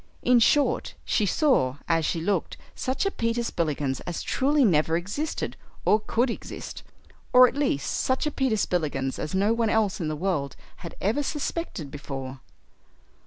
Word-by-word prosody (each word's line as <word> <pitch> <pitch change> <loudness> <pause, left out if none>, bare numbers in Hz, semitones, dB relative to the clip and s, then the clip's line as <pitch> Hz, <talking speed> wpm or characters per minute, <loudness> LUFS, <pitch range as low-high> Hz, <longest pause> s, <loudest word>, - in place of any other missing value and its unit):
In 250 -1 +5
short, 285 +5 +2
she 210 - +1
saw 185 - +2
as 165 -2 +2
she 165 - -1
looked 185 -1 -1 0.2
such 260 +8 -2
a 395 - +1
Peter 230 -3 -1
Spillikins 150 - -1
as 175 - -3
truly 280 +1 +2
never 160 -3 +3
existed, 205 - -3 0.3
or 215 - +5
could 235 +3 0
exist - - -7 0.5
or 250 0 +9
at - - -4
least 275 - 0
such 260 +3 0
a 300 - 0
Peter 260 -6 0
Spillikins 145 -9 -1
as 155 - -3
no 200 +4 +3
one 230 -1 +1
else 215 -4 +1
in 160 - -1
the 155 - -2
world 150 -5 -1 0.2
had 170 - -9
ever 220 +9 +1
suspected 290 - -3
before. 135 -2 -6
200 Hz, 165 wpm, -26 LUFS, 155-250 Hz, 0.5 s, or